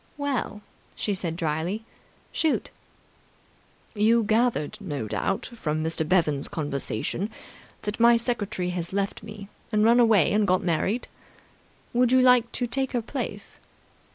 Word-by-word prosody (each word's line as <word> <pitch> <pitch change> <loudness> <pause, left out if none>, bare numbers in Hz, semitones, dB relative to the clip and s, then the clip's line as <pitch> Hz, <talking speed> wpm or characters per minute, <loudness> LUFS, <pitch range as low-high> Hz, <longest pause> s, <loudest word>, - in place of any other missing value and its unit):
"Well?" 270 -7 -2 0.3
she 205 - -1
said 175 -4 -2
dryly. 170 +6 -2 0.5
"Shoot." 320 -2 0 1.2
"You 225 +2 +3
gathered, 220 -3 +1
no 145 - -4
doubt, 195 - -1
from 155 -8 -2
Mr. 160 -1 0
Bevan's 160 -6 +2
conversation, 145 - -3 0.5
that 210 +1 -4
my 235 0 +6
secretary 215 -6 -2
has 175 0 -4
left 200 0 -1
me 210 -1 -9 0.2
and 210 -1 +3
run 235 +2 +6
away 220 -9 +5
and 210 -1 +3
got 185 0 +2
married? 190 +7 0 0.9
Would 245 0 +3
you 260 - +6
like 250 -2 +5
to 245 - -1
take 265 +2 -1
her 240 - +1
place?" 225 -5 -5
210 Hz, 135 wpm, -26 LUFS, 170-235 Hz, 1.2 s, my